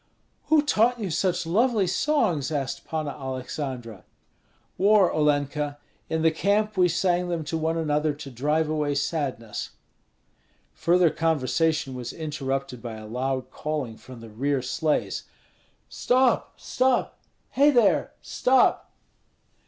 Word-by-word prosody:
"Who 310 -2 +4
taught 245 -3 +2
you 200 -5 -3
such 180 +1 0
lovely 215 +4 +2
songs?" 175 - +1
asked 140 -3 -3
Panna 155 -2 -3
Aleksandra. 130 -4 -6 0.7
"War, 200 -1 +4
Olenka. 145 -1 0 0.3
In 160 0 -1
the 160 - +5
camp 205 +5 +1
we 180 -1 +4
sang 180 +1 +1
them 170 -2 -2
to 155 - -4
one 160 +1 0
another 150 -1 0
to 145 -2 -9
drive 150 +6 0
away 150 -2 -1
sadness." 135 -7 -3 1.0
Further 175 -1 +3
conversation 160 -2 0
was 125 -1 -6
interrupted 135 -5 -4
by 115 -2 -6
a 110 0 -9
loud 130 +3 -3
calling 150 -7 -4
from 125 +1 -12
the 115 -1 -11
rear 135 +4 -1
sleighs: 150 +4 -1 0.6
"Stop! 255 0 +1
stop! 255 -1 0 0.3
Hei 285 +2 +5
there 240 -7 +3
stop!" 260 0 +2
155 Hz, 125 wpm, -25 LUFS, 135-180 Hz, 1.0 s, the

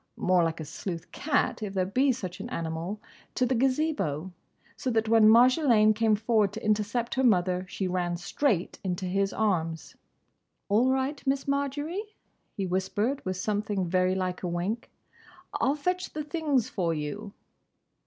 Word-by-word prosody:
—more 180 -1 +3
like 165 0 -1
a 155 - -5
sleuth 165 +3 -6
cat, 290 -5 0
if 200 -2 -4
there 185 -1 +2
be 260 +8 +2
such 190 -7 -5
an 220 +5 -6
animal—to 170 +7 -4
the 255 - +1
Gazebo. 255 - 0 0.4
So 260 - -3
that 225 -2 +1
when 220 -1 +6
Marjolaine 235 -2 +5
came 220 0 +3
forward 215 -2 +1
to 220 - -7
intercept 215 +3 0
her 265 - +1
mother, 185 -5 +2
she 190 - -2
ran 175 -1 -1
straight 185 - -1
into 185 -1 -2
his 195 +2 0
arms. 165 -7 -1 0.7
"All 225 +6 +4
right, 265 +2 0
Miss 275 +1 0
Marjory," 280 +6 -1 0.6
he 195 - -1
whispered, 205 +8 -1
with 185 -1 -2
something 205 -1 -1
very 185 +1 +2
like 185 -1 -2
a 180 - -2
wink, 180 +7 -3 0.6
"I'll 275 - +1
fetch 360 +5 -2
the 305 - -3
things 295 -6 0
for 170 -3 -1
you." 150 +7 -5
210 Hz, 155 wpm, -28 LUFS, 185-255 Hz, 0.7 s, when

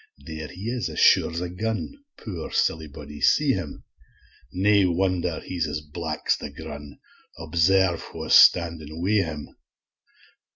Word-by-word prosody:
there 80 -1 -6
he 90 +3 -12
is, 120 -6 -2
as - - -5
sure's 85 +1 +4
a 90 - -2
gun, 110 - -3 0.2
Poor, 90 -8 -7
silly 80 -1 0
body, 75 0 -11
see 150 -2 +4
him; 90 - -5 0.7
Nae 100 +2 +3
wonder 90 -1 0
he's 85 -3 -3
as 75 - -4
black's 75 0 -2
the - - -7
grun, 75 -1 -9 0.4
Observe 85 +3 +2
wha's - - -3
standing 80 -2 +4
wi' 100 +4 +2
him. 75 -3 -7
85 Hz, 135 wpm, -24 LUFS, 80-95 Hz, 0.7 s, sure's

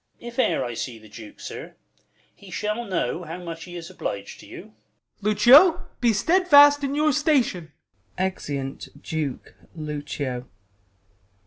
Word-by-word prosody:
If 240 +1 -8
e'er - - +2
I 120 - -4
see 115 +1 -5
the 110 0 -16
Duke, 110 0 -12
sir, - - -8 0.6
he 200 - -16
shall 215 +5 -3
know 175 - -2
How 165 +1 -7
much 165 -2 -8
he 175 -1 -10
is 170 +1 -8
oblig'd 100 - -6
to - - -14
you. - - -9 0.6
Ben. 210 +1 +1
Lucio, 280 - +6
be 240 -2 +3
stedfast 290 - +5
in 275 0 -1
your 305 0 +2
station! 255 - +1 0.5
[Exeunt 145 -7 -4
Duke, 155 -5 -4 0.2
Lucio. 145 -5 -5
180 Hz, 140 wpm, -24 LUFS, -, 0.6 s, Lucio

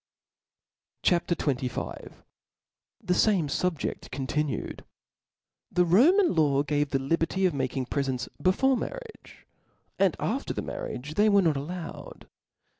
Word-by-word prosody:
CHAP. 175 -1 +2
XXV. 135 -7 -2 0.9
7he 180 - +2
fame 195 -8 +2
SubjeB 165 +2 -2
continued. 140 +3 -3 0.9
TH - - +1
E - - +7
Roman 305 - +5
law 145 -4 +3
gave 145 0 0
the 135 - +1
liberty 165 +7 0
of 180 - +2
mak* 130 -1 -2
ing 130 - -1
prefcnts 130 -2 -2
before 260 +9 +3
marriage; 485 - -8 0.5
after - - 0
the - - -3
mar* - - -5
riage 140 +5 -6
diey 210 +5 +4
were 200 -1 +5
not 160 -4 +2
allowed. 165 +5 -7
160 Hz, 125 wpm, -27 LUFS, 140-190 Hz, 0.9 s, E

